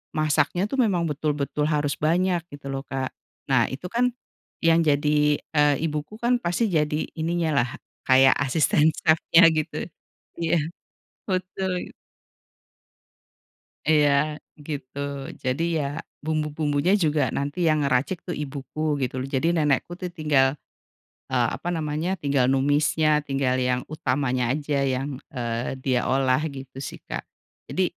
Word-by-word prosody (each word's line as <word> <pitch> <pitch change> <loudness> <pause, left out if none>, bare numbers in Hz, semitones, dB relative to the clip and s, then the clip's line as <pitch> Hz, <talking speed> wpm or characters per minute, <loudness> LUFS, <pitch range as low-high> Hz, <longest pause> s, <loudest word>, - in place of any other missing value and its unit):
masaknya 155 +3 +1
tuh 265 +5 -3
memang 185 -7 +2
betul-betul 150 0 -1
harus 145 -2 +1
banyak 175 +3 +2
gitu 140 -1 -8
loh, 135 - -3
Kak. 130 -1 -3 0.4
Nah 125 -3 +5
itu 140 +7 -7
kan 250 +1 +2 0.5
yang 165 0 +5
jadi, 150 0 +3 0.2
eee, 150 -1 +4
ibuku 150 +7 -4
kan 240 +1 +2
pasti 180 +7 +1
jadi 150 -1 +1
ininya 165 0 0
lah - - -3 0.4
kayak 130 0 +7
asisten 150 +2 +3
chef-nya 160 +2 +4
gitu. 155 0 -2 0.6
Iya, 165 0 +1 0.7
betul 185 0 -2 0.2
git - - -17 2.0
Iya 150 0 +3 0.3
gitu, 140 -3 -6 0.5
Jadi 130 +5 0 0.2
ya 145 - 0 0.4
bumbu-bumbunya 155 +1 0
juga 150 -1 +2
nanti 145 +4 -3
yang 155 - +3
ngeracik 140 +7 +1
tuh 175 - -3
ibuku 140 +1 -7 0.2
gitu, 125 - -2 0.2
jadi 135 +5 +1
nenekku 150 +1 +1
tuh 180 - -3
tinggal, 145 -3 +3 0.8
eee, 125 -2 +3
apa 175 - -6
namanya, 155 +2 -2
tinggal 140 -3 +2
numisnya, 145 +3 +2 0.2
tinggal 135 -2 0
yang 125 0 +1
utamanya 130 -5 0
aja 145 0 -2 0.2
yang, 135 +3 -2 0.2
eee, 120 -2 -2
dia 130 -2 +1
olah 130 0 +2
gitu 135 -1 -10
sih, - - -10
Kak. - - -4 0.4
Jadi 190 - 0
150 Hz, 130 wpm, -25 LUFS, 135-160 Hz, 2.0 s, kayak